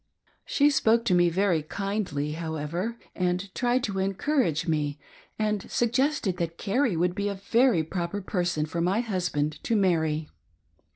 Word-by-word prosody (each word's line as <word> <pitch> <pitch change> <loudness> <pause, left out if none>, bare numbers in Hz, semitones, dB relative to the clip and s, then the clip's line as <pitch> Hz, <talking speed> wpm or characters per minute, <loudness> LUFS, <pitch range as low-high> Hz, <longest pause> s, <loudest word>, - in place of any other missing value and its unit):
She 295 - +3
spoke 230 -3 +3
to 200 - +2
me 175 -1 +5
very 180 -2 +2
kindly, 180 -4 -2
however, 165 +7 -3 0.2
and 180 +1 -1
tried 245 0 +1
to 195 -2 -2
encourage 195 - 0
me, 150 -2 0 0.4
and 210 -2 -1
suggested 240 - +1
that 170 -1 -3
Carrie 220 - +1
would 175 +1 +1
be 200 +1 -2
a 200 - -3
very 225 -1 +3
proper 170 +4 -3
person 175 -5 -1
for 170 +2 -3
my 190 +6 +2
husband 175 -9 -2
to 230 - +1
marry. 160 -6 +1
185 Hz, 150 wpm, -27 LUFS, 165-220 Hz, 0.4 s, me